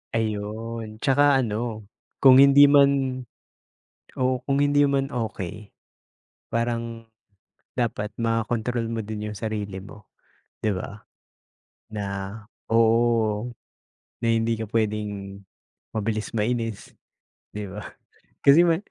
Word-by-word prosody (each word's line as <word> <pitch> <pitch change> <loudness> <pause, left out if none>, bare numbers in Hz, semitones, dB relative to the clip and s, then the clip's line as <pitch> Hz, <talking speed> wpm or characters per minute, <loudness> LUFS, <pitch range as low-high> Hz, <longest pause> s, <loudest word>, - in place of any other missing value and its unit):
Ayun. 110 +1 -4
Tsaka 145 0 +4
ano 110 -1 -3 0.4
kung 130 0 +9
hindi 140 +1 +8
man 140 -2 +3 1.0
oo, 130 -1 +1
kung 140 0 0
hindi 145 0 +4
man 140 -1 +1
okay, 105 -5 -5 0.8
parang 115 -1 -2 0.7
dapat 105 -3 -2
makontrol 115 +1 -1
mo 115 -1 -3
din 105 0 -5
yung 105 - -7
sarili 105 -3 -4
mo, 105 0 -13 0.6
di 105 - +2
ba? 100 +2 -7 0.9
Na 100 0 -5 0.3
oo 115 -1 +2 0.7
na 115 - 0
hindi 115 0 +1
ka 110 - -4
pwedeng 105 -3 -2 0.5
mabilis 110 0 -2
mainis 115 -1 -2 0.6
di 105 0 -6
ba? 105 +3 -7 0.6
Kasi 140 +4 +8
ma 165 -1 +3
115 Hz, 105 wpm, -24 LUFS, 105-125 Hz, 1.0 s, kung